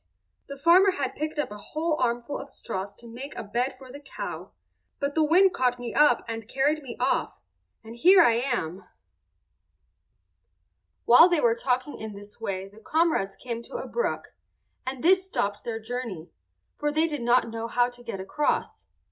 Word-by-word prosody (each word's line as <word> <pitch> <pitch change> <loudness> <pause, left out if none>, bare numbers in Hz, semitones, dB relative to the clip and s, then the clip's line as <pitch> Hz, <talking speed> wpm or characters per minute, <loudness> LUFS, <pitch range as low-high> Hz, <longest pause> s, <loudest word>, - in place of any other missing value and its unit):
The 280 - -8
farmer 355 +7 +5
had 275 -6 -2
picked 305 +1 -4
up 295 - -1
a 210 - -8
whole 310 +8 -2
armful 240 +3 -1
of 280 - -9
straws 200 -5 -5
to 235 - -14
make 250 +5 -8
a - - -5
bed 240 +6 -2
for 260 -1 -13
the 285 - -9
cow; 290 - -7 0.5
but 280 0 -1
the 315 - +3
wind 360 +5 +5
caught 250 -1 +1
me 245 -1 -6
up 295 -5 +4
and 225 -1 -5
carried 290 +4 +1
me 255 -4 -8
off—and 225 +1 -4
here 365 +9 +7
I 235 - +5
am." 230 -8 -2 2.2
While 285 +9 +8
they 345 -3 +2
were 235 -5 +4
talking 255 +4 -2
in 220 -1 -6
this 205 +2 -12
way 195 -3 -3
the 205 +2 -16
comrades 310 - +1
came 235 -2 -5
to 235 - -12
a - - -4
brook, 475 - -2 0.6
and 260 -1 -4
this 375 +2 +4
stopped 210 - -2
their 225 -1 -3
journey, 220 -7 -6 0.5
for 295 0 0
they 315 +2 +2
did 300 -5 -3
not 240 0 +3
know 225 0 -4
how 245 +1 +2
to 245 0 -12
get 215 -5 -5
across. 195 +11 -2
245 Hz, 180 wpm, -26 LUFS, 225-300 Hz, 2.2 s, While